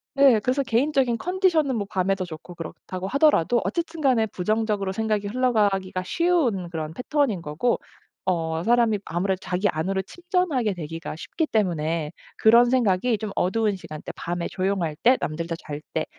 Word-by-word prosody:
네. 275 Hz, -5 st, +6 dB
그래서 255 Hz, +6 st, 0 dB
개인적인 260 Hz, -1 st, +1 dB
컨디션은 340 Hz, -, +1 dB
뭐 205 Hz, -3 st, -2 dB
밤에도 195 Hz, -1 st, 0 dB
좋고 175 Hz, 0 st, -9 dB
그렇다고 180 Hz, +3 st, -7 dB
하더라도 265 Hz, -, +3 dB
어쨌든 335 Hz, -1 st, -3 dB
간에 255 Hz, -7 st, +3 dB
부정적으로 210 Hz, 0 st, -1 dB
생각이 215 Hz, 0 st, -1 dB
흘러가기가 205 Hz, -6 st, +1 dB
쉬운 265 Hz, -, +1 dB
그런 160 Hz, -2 st, -5 dB
패턴인 250 Hz, -, 0 dB
거고, 160 Hz, +11 st, 0 dB, 0.5 s
어 165 Hz, -3 st, 0 dB
사람이 230 Hz, -2 st, +3 dB
아무래도 185 Hz, +3 st, -1 dB
자기 185 Hz, +3 st, 0 dB
안으로 190 Hz, +5 st, -1 dB
침전하게 335 Hz, -, -1 dB
되기가 165 Hz, -1 st, -6 dB
쉽기 310 Hz, -, -3 dB
때문에 165 Hz, -, 0 dB, 0.3 s
그런 235 Hz, +2 st, +6 dB
생각이 235 Hz, -2 st, +2 dB
좀 210 Hz, 0 st, -5 dB
어두운 210 Hz, +3 st, +1 dB
시간 155 Hz, -5 st, -9 dB
때, -, -, -5 dB
밤에, 175 Hz, 0 st, -3 dB
조용할 185 Hz, -5 st, -1 dB
때, 255 Hz, +2 st, +6 dB
남들 165 Hz, +2 st, -3 dB
다 165 Hz, -, -3 dB
잘 150 Hz, -1 st, -7 dB
때 155 Hz, -, 0 dB
205 Hz, 375 characters per minute, -24 LUFS, 175-250 Hz, 0.5 s, 네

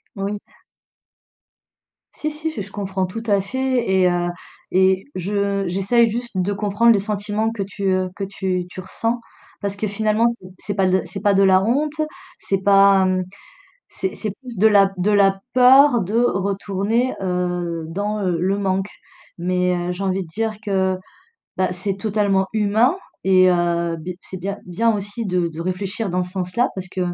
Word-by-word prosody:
Oui. 200 Hz, +1 st, -3 dB, 1.7 s
Si, 305 Hz, 0 st, -3 dB
si, 310 Hz, +1 st, -4 dB
j 215 Hz, -, -5 dB
je 195 Hz, +1 st, -9 dB
comprends 190 Hz, -2 st, -2 dB
tout 225 Hz, +5 st, -6 dB
à 200 Hz, -1 st, +3 dB
fait 255 Hz, +2 st, -1 dB
et 190 Hz, -1 st, +4 dB
heu 175 Hz, 0 st, 0 dB, 0.4 s
et 190 Hz, 0 st, +3 dB
je 200 Hz, +1 st, -1 dB
j'essaye 200 Hz, +6 st, +2 dB
juste 240 Hz, +2 st, -4 dB
de 190 Hz, +2 st, 0 dB
comprendre 210 Hz, +3 st, +3 dB
les 205 Hz, -, +4 dB
sentiments 210 Hz, +2 st, -2 dB
que 220 Hz, -3 st, -5 dB
tu, 200 Hz, +1 st, -8 dB
heu, 185 Hz, -1 st, +1 dB
que 200 Hz, -, -4 dB
tu 190 Hz, -2 st, -2 dB
tu 185 Hz, -, -9 dB
ressens 230 Hz, +5 st, -2 dB, 0.4 s
parce 200 Hz, -1 st, -2 dB
que 215 Hz, +1 st, -2 dB
finalement, 215 Hz, +2 st, +1 dB
c'est 235 Hz, -5 st, -4 dB
c'est 205 Hz, -, -5 dB
pas 195 Hz, -2 st, +2 dB
de 185 Hz, 0 st, +2 dB
c'est -, -, -7 dB
pas 205 Hz, -1 st, +3 dB
de 195 Hz, 0 st, +4 dB
la 190 Hz, 0 st, +5 dB
honte, 285 Hz, +7 st, +1 dB, 0.5 s
c'est 195 Hz, -1 st, -1 dB
pas, 195 Hz, -1 st, +6 dB
mmh, 185 Hz, 0 st, +1 dB, 0.7 s
c'est 190 Hz, -, -4 dB
c'est 215 Hz, -3 st, -3 dB
plus 245 Hz, -5 st, -9 dB
de 220 Hz, +3 st, +5 dB
la 200 Hz, -2 st, +5 dB
de 195 Hz, +4 st, +1 dB
la 195 Hz, -1 st, +3 dB
peur 255 Hz, -1 st, +6 dB
de 200 Hz, +5 st, -3 dB
retourner, 200 Hz, +2 st, 0 dB
heu, 180 Hz, -2 st, -2 dB
dans, 205 Hz, +5 st, -2 dB
heu, 180 Hz, -3 st, 0 dB
le 195 Hz, +3 st, +1 dB
manque. 195 Hz, 0 st, 0 dB, 0.5 s
Mais, 180 Hz, +1 st, +1 dB
heu, -, -, 0 dB
j'ai 180 Hz, +2 st, -4 dB
envie 190 Hz, 0 st, 0 dB
de 170 Hz, -, -13 dB
dire 220 Hz, +6 st, -2 dB
que, 190 Hz, -2 st, +1 dB, 0.6 s
bah, 185 Hz, -1 st, +1 dB
c'est 190 Hz, +2 st, -3 dB
totalement 200 Hz, -2 st, +1 dB
humain 220 Hz, -, +2 dB, 0.3 s
et 185 Hz, -1 st, +5 dB
heu, 170 Hz, -1 st, +1 dB
b 165 Hz, +3 st, -7 dB
c'est 190 Hz, -, -8 dB
bien 200 Hz, +2 st, -4 dB
bien 225 Hz, +6 st, +1 dB
aussi 205 Hz, +2 st, -4 dB
de 180 Hz, -2 st, 0 dB
de 165 Hz, 0 st, -8 dB
réfléchir 190 Hz, +4 st, -3 dB
dans 180 Hz, +1 st, 0 dB
ce 180 Hz, -, -6 dB
sens-là 185 Hz, +6 st, 0 dB
parce 185 Hz, -1 st, -6 dB
que 185 Hz, -, -5 dB
195 Hz, 180 wpm, -21 LUFS, 185-215 Hz, 1.7 s, pas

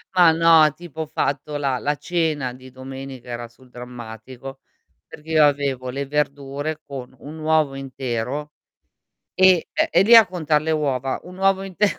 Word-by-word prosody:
ma 175 Hz, -3 st, +7 dB
no, 160 Hz, -2 st, +5 dB
tipo, 170 Hz, -2 st, -8 dB
ho -, -, -2 dB
fatto 145 Hz, -1 st, -2 dB
la 135 Hz, -3 st, -1 dB
la 145 Hz, +1 st, -1 dB
cena 155 Hz, -7 st, -1 dB
di 130 Hz, 0 st, -14 dB
domenica, 130 Hz, -1 st, -9 dB
era 120 Hz, 0 st, -5 dB
sul 125 Hz, +2 st, -22 dB
drammatico, 125 Hz, +2 st, -10 dB, 0.5 s
perché 155 Hz, +2 st, -13 dB
io 155 Hz, -2 st, +6 dB
avevo 140 Hz, -3 st, 0 dB
le 140 Hz, +2 st, -3 dB
verdure 145 Hz, +1 st, -2 dB
con 130 Hz, -2 st, -8 dB
un 155 Hz, +3 st, -10 dB
uovo 155 Hz, -3 st, +1 dB
intero 135 Hz, +2 st, -4 dB, 0.8 s
e 185 Hz, -3 st, +4 dB
ehm, -, -, +1 dB
e 175 Hz, -, +5 dB
lì 230 Hz, +3 st, +7 dB
a 225 Hz, -2 st, +9 dB
contar 155 Hz, -5 st, 0 dB
le 160 Hz, +1 st, -1 dB
uova, 135 Hz, -4 st, -1 dB
un 180 Hz, +1 st, -12 dB
uovo 195 Hz, 0 st, +2 dB
inte 195 Hz, +2 st, 0 dB
145 Hz, 165 wpm, -22 LUFS, 130-160 Hz, 0.8 s, a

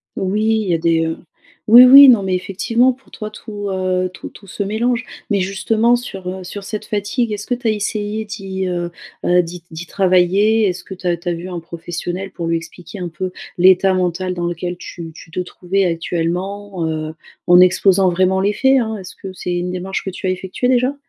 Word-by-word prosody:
Oui, 195 Hz, +3 st, -1 dB, 0.2 s
il 210 Hz, -, -4 dB
y -, -, +2 dB
a -, -, +1 dB
des, 165 Hz, 0 st, +1 dB
heu, 160 Hz, -, -3 dB, 0.5 s
oui, 240 Hz, +3 st, +10 dB
oui, 275 Hz, +2 st, +10 dB
non, 240 Hz, -5 st, +6 dB
mais, 190 Hz, -1 st, -1 dB
effectivement 230 Hz, +7 st, +1 dB
pour 265 Hz, +2 st, -23 dB
toi, 215 Hz, -1 st, -7 dB
tout, 205 Hz, -1 st, -7 dB
heu, 185 Hz, -1 st, -1 dB
tout -, -, -9 dB
tout 200 Hz, -, -16 dB
se 200 Hz, -, -7 dB
mélange 230 Hz, +4 st, 0 dB, 0.3 s
mais 200 Hz, -, +2 dB
justement 215 Hz, +5 st, +1 dB
sur, 195 Hz, -6 st, -7 dB
heu, 185 Hz, 0 st, -6 dB
sur 200 Hz, +3 st, -7 dB
cette 210 Hz, +1 st, -5 dB
fatigue, 215 Hz, +3 st, -1 dB
est-ce 210 Hz, 0 st, -5 dB
que 245 Hz, -, 0 dB
tu 245 Hz, -1 st, -4 dB
as -, -, +4 dB
essayé 210 Hz, 0 st, -2 dB
d'y, 195 Hz, -3 st, -5 dB
heu, 175 Hz, -1 st, -3 dB, 0.3 s
bah 180 Hz, 0 st, +4 dB
d'y 170 Hz, 0 st, -8 dB
d'y 165 Hz, +2 st, -7 dB
travailler? 195 Hz, +4 st, +3 dB
Est-ce 180 Hz, -1 st, -3 dB
que 190 Hz, -, -9 dB
tu 180 Hz, -1 st, -6 dB
as 175 Hz, -1 st, +1 dB
tu 170 Hz, +1 st, -5 dB
as -, -, 0 dB
vu 170 Hz, +2 st, -6 dB
un 175 Hz, -2 st, -4 dB
professionnel 175 Hz, +3 st, -6 dB
pour 170 Hz, -3 st, -5 dB
lui 165 Hz, 0 st, +1 dB
expliquer 175 Hz, +4 st, -10 dB
un 175 Hz, -1 st, -4 dB
peu 185 Hz, +3 st, -5 dB, 0.3 s
l'état 185 Hz, +1 st, +5 dB
mental 180 Hz, 0 st, -1 dB
dans 175 Hz, -1 st, -3 dB
lequel 175 Hz, +1 st, -4 dB
tu 170 Hz, -2 st, -8 dB
tu 165 Hz, -, -13 dB
te 175 Hz, -, -4 dB
trouvais 180 Hz, +2 st, -1 dB
actuellement, 180 Hz, +3 st, -3 dB
heu, 155 Hz, 0 st, -4 dB, 0.3 s
en 175 Hz, 0 st, +7 dB
exposant 185 Hz, +1 st, +4 dB
vraiment 185 Hz, +2 st, +2 dB
les 200 Hz, +2 st, +1 dB
faits, 265 Hz, +3 st, +3 dB
hein? 220 Hz, -1 st, -3 dB
Est-ce 190 Hz, -1 st, -10 dB
que 190 Hz, -1 st, -9 dB
c'est 180 Hz, -1 st, -4 dB
une 180 Hz, +1 st, -2 dB
démarche 185 Hz, +1 st, -4 dB
que 190 Hz, -, -4 dB
tu 185 Hz, -, -5 dB
as -, -, +1 dB
effectuée, 185 Hz, +6 st, -2 dB
déjà? 255 Hz, +2 st, +2 dB
190 Hz, 220 wpm, -18 LUFS, 175-210 Hz, 0.5 s, oui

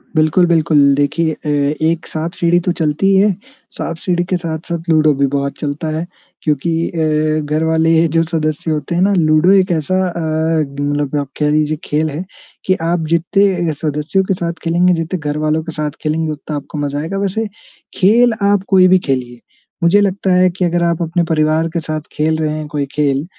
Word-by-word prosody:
बिल्कुल, 155 Hz, +3 st, +3 dB
बिल्कुल, 160 Hz, -2 st, +3 dB, 0.2 s
देखिए 155 Hz, +3 st, 0 dB
अ, 150 Hz, -, -10 dB, 0.4 s
एक 165 Hz, 0 st, -2 dB
साँप-सीढ़ी 170 Hz, +2 st, 0 dB
तो 180 Hz, +1 st, -1 dB
चलती 155 Hz, +4 st, +1 dB
ही 195 Hz, -, +4 dB
है, 210 Hz, -, +4 dB, 0.5 s
साँप-सीढ़ी 175 Hz, +1 st, -2 dB
के 185 Hz, -, +1 dB
साथ-साथ 170 Hz, 0 st, -5 dB
लूडो 155 Hz, -2 st, +4 dB
भी 140 Hz, -, +3 dB
बहुत 140 Hz, 0 st, -2 dB
चलता 150 Hz, +2 st, -3 dB
है 165 Hz, -, -3 dB, 0.4 s
क्योंकि 150 Hz, +2 st, 0 dB, 0.2 s
अ, 155 Hz, -1 st, 0 dB
घर 155 Hz, +2 st, -1 dB
वाले 160 Hz, 0 st, +2 dB
ये 165 Hz, +1 st, +4 dB
जो 165 Hz, -, +4 dB
सदस्य 160 Hz, -1 st, -2 dB
होते 150 Hz, +2 st, -2 dB
हैं 175 Hz, -, +1 dB
ना 200 Hz, +2 st, +3 dB
लूडो 155 Hz, +2 st, +4 dB
एक 190 Hz, -1 st, +4 dB
ऐसा 160 Hz, +2 st, 0 dB
अ, 170 Hz, -, -6 dB, 0.6 s
मतलब 145 Hz, 0 st, -1 dB
आप 140 Hz, -, -7 dB
कह 150 Hz, -1 st, +2 dB
लीजिए 155 Hz, 0 st, +1 dB
खेल 155 Hz, +1 st, -1 dB
है 155 Hz, +5 st, -5 dB, 0.4 s
कि 185 Hz, -, +3 dB
आप 165 Hz, 0 st, 0 dB
जितने 175 Hz, +1 st, +1 dB
अ, 155 Hz, -, -1 dB
सदस्यों 150 Hz, +5 st, 0 dB
के 190 Hz, -, 0 dB
साथ 170 Hz, -1 st, -3 dB
खेलेंगे, 175 Hz, +2 st, +2 dB
जितने 165 Hz, +2 st, -2 dB
घर 150 Hz, 0 st, -3 dB
वालों 155 Hz, +1 st, 0 dB
के 165 Hz, -, -6 dB
साथ 150 Hz, -1 st, -3 dB
खेलेंगे, 155 Hz, +1 st, -1 dB
उतना 150 Hz, 0 st, -6 dB
आपको 145 Hz, +1 st, -6 dB
मज़ा 145 Hz, 0 st, -2 dB
आएगा। 170 Hz, +6 st, -4 dB
वैसे, 200 Hz, +3 st, -1 dB, 0.5 s
खेल 230 Hz, +5 st, +4 dB
आप 200 Hz, -1 st, +2 dB
कोई 185 Hz, -2 st, +5 dB
भी 185 Hz, 0 st, +5 dB
खेलिए, 125 Hz, -2 st, -2 dB, 0.4 s
मुझे 195 Hz, +5 st, +5 dB
लगता 195 Hz, -1 st, 0 dB
है 185 Hz, 0 st, +4 dB
कि 180 Hz, +1 st, -2 dB
अगर 175 Hz, 0 st, 0 dB
आप 170 Hz, 0 st, 0 dB
अपने 170 Hz, +1 st, 0 dB
परिवार 155 Hz, 0 st, +2 dB
के 170 Hz, -, 0 dB
साथ 155 Hz, -1 st, -4 dB
खेल 155 Hz, +1 st, 0 dB
रहे 155 Hz, -1 st, -1 dB
हैं 155 Hz, -1 st, -5 dB
कोई 145 Hz, -1 st, -2 dB
खेल, 145 Hz, -1 st, 0 dB
160 Hz, 200 wpm, -16 LUFS, 150-175 Hz, 0.6 s, कोई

